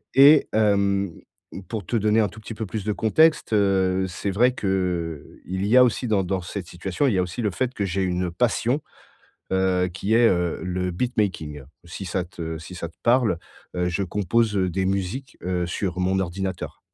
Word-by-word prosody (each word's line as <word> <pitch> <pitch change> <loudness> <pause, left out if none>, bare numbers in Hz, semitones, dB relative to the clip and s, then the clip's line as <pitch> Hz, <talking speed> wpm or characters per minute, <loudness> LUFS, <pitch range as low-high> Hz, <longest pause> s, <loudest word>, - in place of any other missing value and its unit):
et 145 +2 +8
hem, 100 -3 +2 0.6
pour 110 -5 -4
te 120 - 0
donner 110 +1 +3
un 105 - +1
tout 110 - -12
petit 110 +1 -8
peu 110 - -4
plus 105 +1 -4
de 105 - 0
contexte, 115 - +3
heu, 95 -2 +2
c'est 90 +3 -3
vrai 125 +6 +3
qu'il 90 - -2 0.2
y 115 - +3
a 125 - +9
aussi 125 +1 0
dans 105 -3 +2
dans 95 +1 -2
cette 90 +1 -6
situation, 95 +9 -2
il 125 - +2
y - - +1
a - - +3
aussi 90 +7 -5
le 105 -3 0
fait 130 +6 -2
que 105 - -2
j'ai 95 +1 -1
une 90 -1 -1
passion, 120 - +1 0.7
heu, 95 -1 +2
qui 100 +4 -1
est, 115 0 +6
heu, 90 -3 0
le 90 0 -2
beat 120 +8 -2
making, 80 -8 -1 0.2
si 90 +3 -7
ça 90 +1 -1
te 85 -2 -6
si 85 +3 -10
ça 85 - -5
te 80 - -21
parle. 120 -7 +3 0.4
Heu, 90 0 +1
je 90 +3 -1
compose, 105 +4 +1
heu, 95 -2 +1
des 95 +2 -1
musiques 100 +8 -3
heu, 90 -1 -1
sur 90 +1 -3
mon 95 +1 +1
ordinateur. 95 +1 -4
95 Hz, 200 wpm, -24 LUFS, 90-110 Hz, 0.7 s, a